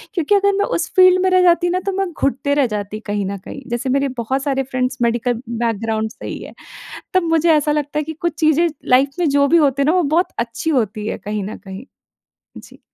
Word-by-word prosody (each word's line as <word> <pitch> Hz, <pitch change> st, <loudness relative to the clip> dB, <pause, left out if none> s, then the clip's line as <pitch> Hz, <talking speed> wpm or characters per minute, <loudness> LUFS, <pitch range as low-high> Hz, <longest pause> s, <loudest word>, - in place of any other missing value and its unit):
क्योंकि 345 Hz, +4 st, +2 dB
अगर 400 Hz, 0 st, +3 dB
मैं -, -, +2 dB
उस -, -, -3 dB
फील्ड 370 Hz, 0 st, +6 dB
में 375 Hz, -, +3 dB
रह 370 Hz, 0 st, +5 dB
जाती 350 Hz, 0 st, +3 dB
ना, 365 Hz, +1 st, 0 dB
तो 390 Hz, +1 st, -3 dB
मैं 385 Hz, -2 st, -2 dB
घुटते 280 Hz, +1 st, 0 dB
रह 255 Hz, -, +2 dB
जाती 205 Hz, +1 st, -5 dB
कहीं 205 Hz, -1 st, -1 dB
न 200 Hz, 0 st, -4 dB
कहीं। 275 Hz, +8 st, -10 dB
जैसे 240 Hz, +2 st, -2 dB
मेरे 275 Hz, +1 st, +1 dB
बहुत 265 Hz, +4 st, -2 dB
सारे 270 Hz, -2 st, 0 dB
फ्रेंड्स 255 Hz, 0 st, -2 dB
मेडिकल 235 Hz, 0 st, 0 dB
बैकग्राउंड 225 Hz, -1 st, -2 dB
से -, -, -10 dB
ही -, -, -5 dB
हैं। -, -, -11 dB, 0.6 s
तब 370 Hz, -, +4 dB
मुझे 325 Hz, +1 st, +3 dB
ऐसा 300 Hz, 0 st, +2 dB
लगता 295 Hz, 0 st, -2 dB
है 300 Hz, -, -1 dB
कि 320 Hz, -, -5 dB
कुछ 340 Hz, -2 st, -1 dB
चीज़ें 315 Hz, +2 st, +3 dB, 0.3 s
लाइफ़ 275 Hz, +1 st, +2 dB
में 330 Hz, -, +2 dB
जो 280 Hz, 0 st, +3 dB
भी 340 Hz, -, +4 dB
होते 280 Hz, -3 st, +3 dB
हैं -, -, +1 dB
ना, 365 Hz, -, +2 dB
वो 360 Hz, -, +3 dB
बहुत 325 Hz, +5 st, +1 dB
अच्छी 235 Hz, +7 st, -2 dB
होती 215 Hz, -5 st, -1 dB
हैं -, -, -4 dB
कहीं 210 Hz, -1 st, -3 dB
न 210 Hz, -, -7 dB
कहीं। 195 Hz, +4 st, -10 dB, 0.7 s
जी। -, -, -14 dB
275 Hz, 235 wpm, -19 LUFS, 230-335 Hz, 0.7 s, फील्ड